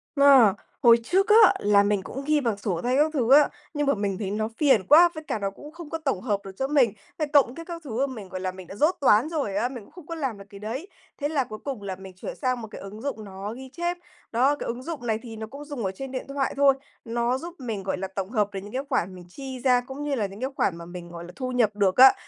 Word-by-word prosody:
Ờ, 275 -8 +7 0.3
hồi 235 -1 +8
trước 385 - +2
á, 435 -1 +8
là 205 0 +4
mình 205 -1 +1
cũng 270 +7 -6
ghi 300 0 +2
bằng 225 -5 0
sổ 190 -5 -2
tay 250 +2 +1
các 305 +2 +3
thứ 255 -3 +1
á, 290 +1 +7 0.2
nhưng 290 -1 -1
mà 280 - +4
mình 200 -2 -2
thấy 195 -2 -3
nó 215 +1 -1
phiền 265 -9 +4
quá, 340 +4 +8
với 315 - -6
cả 220 - -3
nó 195 -1 -1
cũng 295 +9 -12
không 335 -2 -10
có 325 - -2
tổng 275 - -2
hợp 210 -5 0
được 195 - -7
cho 265 - 0
mình, 270 -8 +3 0.2
à, 310 - 0
cộng 270 -3 +5
kiết 330 +1 -9
các 340 -1 -6
thứ 265 0 -1
mà 265 - -7
mình, 205 -5 -9
gọi 185 0 -5
là, 185 - -1
mình 185 -1 -11
đã 195 - -9
dốt 310 - +3
toán 245 +1 +5
rồi 280 -12 -2
á, 235 +5 +1
mình 245 -5 -8
cũng - - -20
không 355 -4 -13
có 335 - -5
làm 270 -9 -3
được 200 - -11
cái 200 - -11
đấy. 235 - -5 0.3
Thế 290 - 0
là 295 -4 +1
cuối 215 -3 -9
cùng 270 -7 -4
là 195 -2 -4
mình 190 0 -11
chuyển 185 - -7
sang 255 -3 -1
một 220 - -7
cái - - -9
ứng 200 +3 -9
dụng 265 -5 -4
nó 200 +2 -6
ghi 260 +1 -10
chép, 345 +4 -2 0.3
đó, 260 +5 +3
cái - - -6
ứng 240 +2 -4
dụng 290 -7 -5
này 220 -1 +1
thì 225 -2 -9
nó 220 0 -6
cũng 280 +5 -10
dùng 285 -8 -4
ở 190 - 0
trên 270 +6 -7
điện 255 - -4
thoại 275 -1 -1
thôi, 280 -1 +6 0.3
nó 235 +2 0
giúp 340 +4 -8
mình, 225 -7 -4
gọi 190 - -2
là, 190 - -3
tổng 190 0 -5
hợp 210 -3 +1
được 195 - -3
những 205 - -10
cái 265 +2 -2
khoản 190 -8 0
mình 180 -1 -11
chi 265 +5 -7
ra 250 -1 +3
cũng 265 +3 -7
như 290 -1 -1
là 215 -5 0
những 195 +2 -8
cái 260 - -1
khoản 170 -3 0
mà 170 - -9
mình, 175 0 -9
gọi 170 0 -8
là, 175 - -10
thu 255 -1 -4
nhập 225 -5 +2
được 195 -2 +2
á. 265 +1 +10
245 Hz, 300 wpm, -26 LUFS, 200-280 Hz, 0.3 s, á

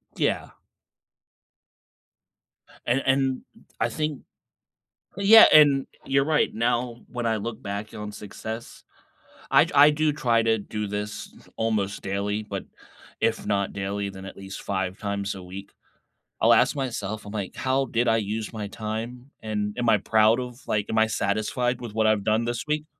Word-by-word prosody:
Yeah. - - -1 2.3
And 125 +3 +2
and, 135 -1 +1 0.4
I - - +1
think 150 -2 -3 0.9
well, 200 - -3
yeah, 220 +2 +10
and 145 -3 +6 0.2
you're 135 0 +2
right. 155 0 +2
Now, 120 +1 0
when 120 -1 -3
I 110 -1 +1
look 115 +3 -5
back 100 0 -5
on 105 0 -6
success, 110 +3 -8 0.7
I - - +6
d - - -8
I 145 +1 +8
do 150 0 +1
try 115 -5 +2
to 110 0 +2
do 105 +1 -4
this 105 +1 -5 0.2
almost 105 -3 -1
daily, 100 +2 -2
but, 100 -2 -6 0.6
if 115 0 0
not 100 -1 0
daily, 100 0 -3
then 95 0 -10
at 95 - -9
least 95 0 -8
5 95 -1 -2
times 100 -1 -3
a 95 - -9
week. 95 +2 -9 0.7
I'll - - +6
ask - - +4
myself, 110 -6 -3
I'm 105 - -8
like, 100 -3 -4
"How 135 +1 +1
did 120 0 0
I 115 - +4
use 110 0 -3
my 105 -2 -4
time?" 115 +5 -6
And, 105 -1 -3
"Am 120 -1 +1
I 110 - +5
proud 110 +3 +3
of, 125 0 -7
like, 105 -1 0
am 110 - -1
I 110 0 +5
satisfied 110 +4 -1
with 115 -3 -7
what 110 0 +2
I've 110 -2 +2
done 110 +2 +1
this 120 +2 -3
week?" 150 0 -1
110 Hz, 165 wpm, -25 LUFS, 105-125 Hz, 2.3 s, yeah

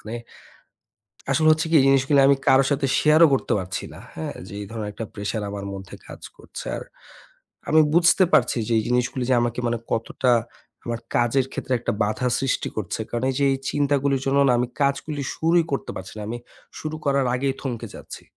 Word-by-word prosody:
মানে 110 +2 -7 1.2
আসলে 155 -1 +3
হচ্ছে 155 +1 +1
কি 165 - +2
এই - - +2
জিনিসগুলি 135 +1 +4
আমি 140 - +5
কারো 135 +1 +6
সাথে 140 0 +1
share 155 +2 +5
ও - - +5
করতে 135 - 0
পারছি 95 0 -5
না, - - -11 0.2
হ্যাঁ? 80 - -5
যে 100 - -10
এই - - -6
ধরনের 110 -2 -4
একটা 115 - -5
pressure 105 +1 -3
আমার 100 -1 -6
মধ্যে 95 -2 -9
কাজ - - -11 0.2
করছে। - - -10
আর - - -7 0.9
আমি 155 +1 +6
বুঝতে 175 +2 +5
পারছি 125 0 +3
যে 120 - 0
এই 110 - -2
জিনিসগুলি 125 +1 0
যে 130 - +4
আমাকে 120 +1 -1
মানে 120 0 0
কতটা 120 +2 0 0.5
আমার 115 -1 -3 0.2
কাজের 120 +2 +2
ক্ষেত্রে 130 - -3
একটা 115 - -2
বাধা 110 +5 -1
সৃষ্টি 135 -1 -1
করছে। 110 +1 -3
কারণ 120 +1 -3
এই - - -6
যে 140 - +3
এই - - -2
চিন্তাগুলির 140 -2 +1
জন্য 135 +1 +2
না - - +5
আমি 125 - 0
কাজগুলি 140 +1 -1
শুরুই 165 +1 +3
করতে 140 - -2
পারছি 95 0 -8
না। - - -5
আমি 120 - -3 0.4
শুরু 155 0 -4
করার 140 -1 +2
আগেই 135 +1 0
থমকে 125 -5 -4
যাচ্ছি। - - -10
130 Hz, 200 wpm, -23 LUFS, 115-140 Hz, 1.2 s, কারো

